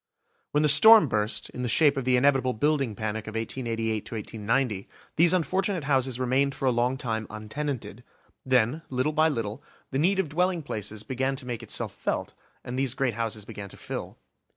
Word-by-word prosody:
When 150 +1 +1
the - - +4
storm 215 +6 +8
burst, 105 -2 -1
in 125 - -6
the 125 - -1
shape 145 +4 +5
of 135 -2 -3
the 130 0 +3
inevitable 135 -1 +3
building 135 -2 0
panic 110 +1 -4
of 110 - -7
1888 115 -2 -2
to 115 - -6
1890, 110 0 -1 0.3
these 170 +1 +5
unfortunate 185 0 0
houses 130 -3 +1
remained 135 +2 +1
for - - -4
a 130 - +4
long 120 +2 +1
time 110 -3 -3
untenanted. 110 0 -5 0.4
Then, 130 +3 +2
little 130 +4 0
by 155 +1 +4
little, 115 -3 -3 0.3
the 135 - -1
need 185 +6 +3
of 190 -4 +1
dwelling 175 +2 0
places 105 -4 -5
began 130 +2 -1
to 130 - -8
make 120 -2 -4
itself - - -4
felt, - - -3 0.3
and 125 +1 -4
these 135 -2 0
great 135 -4 0
houses 110 -2 -3
began 100 -1 -8
to - - -12
fill. - - -6
130 Hz, 190 wpm, -27 LUFS, 110-145 Hz, 0.4 s, storm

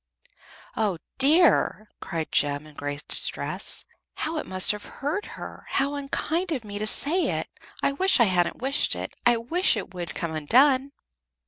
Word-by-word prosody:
"Oh, 210 -5 0 0.2
dear!" 290 -6 +4
cried 165 -3 -5
Jem, 145 +1 0
in 155 - -15
great 145 0 -6
distress. - - 0 0.3
"How 315 +1 -3
it - - -4
must 185 0 +3
have 210 -1 -6
hurt 305 +9 -4
her! - - -10
How 275 +1 0
unkind 315 +5 -2
of 265 -7 -2
me 205 0 -6
to 215 - -1
say 340 +11 +4
it! - - -3 0.4
I - - +2
wish 375 +3 +3
I - - +7
hadn't 185 +3 0
wished 275 +2 +1
it. - - -6
I 240 -1 +4
wish 320 +5 +2
it 190 -2 -6
would 175 -4 -6
come 170 - -3
undone." 260 - +3
240 Hz, 165 wpm, -25 LUFS, 180-290 Hz, 0.4 s, I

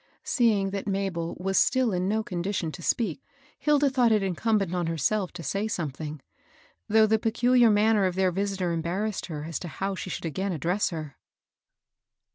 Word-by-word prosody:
Seeing 210 -6 +2
that 200 0 -4
Mabel 190 -4 -2
was 195 +1 +1
still 255 -4 +2
in 180 +1 0
no 220 +1 0
condition 180 -3 -2
to 175 - -9
speak, 190 -1 -1 0.4
Hilda 295 -1 +3
thought 255 -3 +3
it 210 -2 +3
incumbent 195 0 0
on 175 -2 -1
herself 170 +5 0
to 170 - -7
saj 200 +5 -1
something; 155 -5 -4 0.7
though 220 +1 +6
the 220 +1 +2
peculiar 240 +2 +4
manner 210 -1 +3
of 185 -1 -1
their 190 -1 +2
visitor 195 -1 -1
embarrassed 180 +6 -2
her 150 -4 -5
as 165 0 -4
to 175 - -6
how 195 +4 -3
she 185 - -6
should 175 - -5
again 190 +5 -2
address 175 +6 0
her. 155 -5 -7
195 Hz, 175 wpm, -27 LUFS, 170-215 Hz, 0.7 s, though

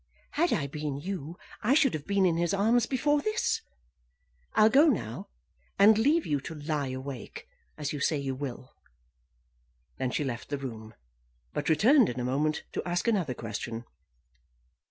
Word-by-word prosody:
Had 340 +4 +1
I 145 - +1
been 145 0 -4
you 170 0 -5 0.2
I 245 +6 +3
should 275 -4 +4
have 150 -2 -5
been 200 -1 +3
in 170 -3 +3
his 170 +2 +1
arms 225 +4 +3
before 290 +3 +1
this. 430 +6 0 0.9
I'll 215 - +7
go 280 +8 +6
now, 185 - -1 0.5
and 205 +2 +7
leave 290 +10 +3
you 145 -2 0
to 160 - -7
lie 150 -2 -2
awake, 130 0 -7 0.3
as 150 -1 -3
you 145 - -4
say 150 +3 +1
you 135 -1 -2
will." 130 -1 -6 1.3
Then 130 - 0
she 150 - -1
left 120 -4 -5
the 145 - -2
room, 115 -5 -8 0.6
but 150 - -2
returned 230 - +5
in 125 - -4
a 125 - -2
moment 150 +4 0
to - - -2
ask 175 +4 -1
another 180 - +1
question. 115 +1 -5
155 Hz, 165 wpm, -29 LUFS, 135-215 Hz, 1.3 s, I'll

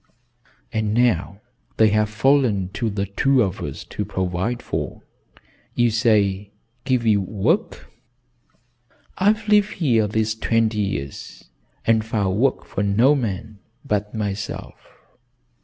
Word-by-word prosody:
"And 110 -1 0
now 105 -5 +1 0.4
they 110 -1 +5
have 105 0 +1
fallen 110 -4 +2
to 110 +4 -2
the 100 -1 -2
two 130 +6 +2
of 95 -3 -3
us - - -6
to - - -5
provide 95 +6 -2
for. - - -4 0.7
You 120 -1 +3
say, 105 -3 +2 0.4
give 130 -3 +1
you 105 -3 +3
work? 110 - -1 1.3
I've 210 +3 +2
lived 210 0 +3
here 120 - +2
these 110 +1 0
twenty 110 -1 0
years 70 -11 -5 0.3
and 110 -1 +3
found 105 -4 -1
work 135 +1 +1
for - - -4
no 110 +8 +4
man 110 -5 -3 0.3
but 105 -3 -2
myself. 100 -2 -5
110 Hz, 125 wpm, -22 LUFS, 100-120 Hz, 1.3 s, they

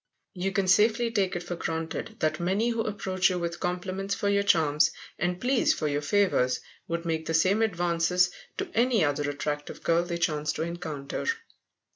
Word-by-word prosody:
You 190 +1 -2
can 195 0 0
safely 220 +4 +4
take 195 -5 +1
it 175 - -3
for 175 0 -4
granted 165 +6 -4
that 155 0 +1
many 195 +7 +1
who 230 -1 0
approach 190 -3 0
you 180 - -1
with 170 0 -3
compliments 185 +2 -2
for 200 - 0
your 200 0 +3
charms, 160 -6 +3 0.3
and 180 0 -1
pleas 250 +3 +2
for 155 - -1
your 145 0 0
favours, 145 -7 +2 0.3
would 170 0 -3
make 160 -1 -2
the 160 - 0
same 190 +7 +3
advances 180 -2 +2 0.3
to - - -4
any 235 -6 +3
other 145 0 0
attractive 145 +1 -4
girl 170 0 +3
they 175 0 -3
chanced 150 -3 0
to - - -1
encounter. 160 -5 -5
175 Hz, 180 wpm, -27 LUFS, 160-195 Hz, 0.3 s, safely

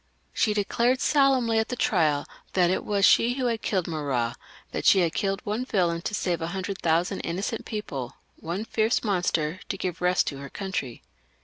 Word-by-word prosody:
She 215 -2 +1
declared 235 +5 +1
solemnly 265 -7 +3
at 220 - 0
the 250 - -2
trial 150 -10 +2 0.3
that 180 -2 +3
it - - 0
was 200 -1 +2
she 240 +2 +5
who 250 -3 0
killed 190 -5 -1
Marat; 140 -8 -1 0.4
that - - -4
she 190 - +6
had 170 -2 +1
killed 195 -1 -1
one 215 +4 -1
villain 175 -8 0
to 210 - -3
save 175 -5 -1
a 165 - -2
hundred 190 0 -4
thousand 170 +2 +1
innocent 195 +7 -3
people, 140 - -5 0.2
one 180 +7 -4
fierce 225 +1 +1
monster 180 -5 0
to 195 - -2
give 180 -3 -4
rest 180 0 +3
to 140 - -8
her 140 0 -8
country. 190 - -4
190 Hz, 185 wpm, -26 LUFS, 165-220 Hz, 0.4 s, she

